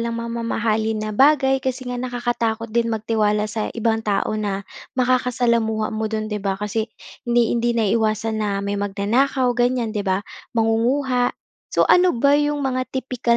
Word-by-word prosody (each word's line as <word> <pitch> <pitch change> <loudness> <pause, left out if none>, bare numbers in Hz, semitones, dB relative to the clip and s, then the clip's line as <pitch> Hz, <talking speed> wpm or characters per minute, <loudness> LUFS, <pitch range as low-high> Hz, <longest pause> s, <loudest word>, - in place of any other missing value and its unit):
ng 235 0 -2
mga 235 0 -4
mamahalin 220 -1 0
na 215 - -3
bagay 270 +1 +4
kasi 260 0 -3
nga 245 0 -3
nakakatakot 240 -3 -2
din 235 0 +1
magtiwala 215 -1 +1
sa 215 0 -3
ibang 225 0 +1
tao 210 -2 0
na 200 -1 -2 0.3
makakasalamuha 240 -4 +1
mo 220 0 -2
do'n 215 0 -3
'di 210 - -2
ba? 195 -1 -1
Kasi 210 +2 -2 0.4
hindi 240 -1 +3
hindi 240 0 +1
naiiwasan 220 0 +1
na 210 - 0 0.2
may 200 0 -2
magnanakaw 240 +6 +1
ganiyan, 245 -2 0
'di 210 - -2
ba? 190 +1 0 0.3
Mangunguha. 245 +3 +2 0.4
So - - +4
ano 360 -5 +4
ba 280 +4 +3
'yong 295 0 +1
mga 255 -2 -1
tipikal 250 -2 0
230 Hz, 160 wpm, -21 LUFS, 215-250 Hz, 0.4 s, bagay